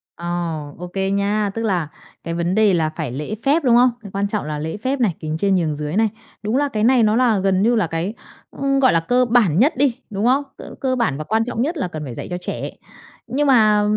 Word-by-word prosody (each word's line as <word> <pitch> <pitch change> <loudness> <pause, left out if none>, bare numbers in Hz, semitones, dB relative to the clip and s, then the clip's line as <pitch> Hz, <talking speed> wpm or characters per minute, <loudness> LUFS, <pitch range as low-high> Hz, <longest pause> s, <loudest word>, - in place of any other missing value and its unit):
Ờ, 170 - -9 0.5
ô 180 +1 -7
kê 195 +2 -2
nha. 200 +1 0
Tức 225 - -2
là 180 -8 0 0.4
cái 165 - -4
vấn 170 +3 -1
đề 215 -3 +4
là 160 -2 +1
phải 140 -5 -5
lễ 150 +11 -4
phép, 295 +3 +2
đúng 240 -2 +4
không? 250 +1 +5
Cái 200 -3 -10
quan 200 +1 -1
trọng 205 -5 -3
là 150 -1 -4
lễ 160 +6 -4
phép 260 +4 -2
này, 200 -9 +1
kính 155 0 -3
trên 195 +2 +2
nhường 160 -4 0
dưới 150 +3 -4
này. 220 0 +3 0.3
Đúng 220 +5 0
là 285 0 +1
cái 215 -4 -2
này 245 -1 +4
nó 215 +1 +3
là 235 -5 +3
gần 190 0 +1
như 235 +3 +3
là 210 -7 +1
cái, 165 +6 -3 0.4
ư, 275 0 0
gọi 260 -6 +4
là, 165 - +4
cơ 245 +9 +2
bản 220 -8 +3
nhất 290 +6 +4
đi, 270 -4 +2
đúng 205 +2 -2
không? 270 +3 +3
Tức - - -10
là - - -11
cơ 260 -1 +1
bản 160 - 0
và 155 - -4
quan 220 +6 +1
trọng 240 -1 -3
nhất 320 +5 -1
là 255 - -1
cần 155 -3 -6
phải 120 -3 -7
dạy - - -6
cho 180 - -3
trẻ. - - -4 0.6
Nhưng 285 +4 0
mà 215 -5 +5
210 Hz, 265 wpm, -20 LUFS, 175-245 Hz, 0.6 s, không